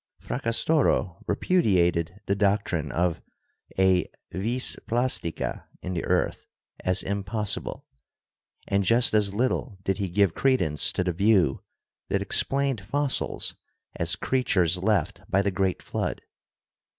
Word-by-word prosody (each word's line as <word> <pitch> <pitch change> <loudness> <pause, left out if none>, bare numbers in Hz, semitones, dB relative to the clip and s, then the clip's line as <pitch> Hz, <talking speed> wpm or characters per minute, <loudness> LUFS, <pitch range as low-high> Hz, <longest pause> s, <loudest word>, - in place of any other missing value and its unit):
Fracastoro 120 - 0
re 105 - +1
pudiated 90 - +1
the 100 - +1
doctrine 100 -5 0
of 85 -1 0 0.6
a 95 -1 +3 0.2
"vis 115 +8 -1
plastica" 120 -8 -1 0.2
in 90 - -3
the 85 - -2
earth - - 0 0.4
as 90 0 +2
impossible, 100 +1 -2 0.8
and 100 0 +1
just 115 +5 +4
as 105 -2 +3
little 125 -2 -1
did 95 - 0
he 100 -3 -2
give 95 -1 +2
credence 90 - +2
to - - -1
the 90 -1 -1
view 95 -6 +3 0.5
that - - +1
explained 135 -5 +1
fossils 135 +7 -1 0.4
as - - +1
creatures 95 -10 +1
left 105 +2 0
by 100 +1 +2
the 100 - 0
great 95 -1 -1
Flood. - - -3
100 Hz, 125 wpm, -26 LUFS, 90-115 Hz, 0.8 s, just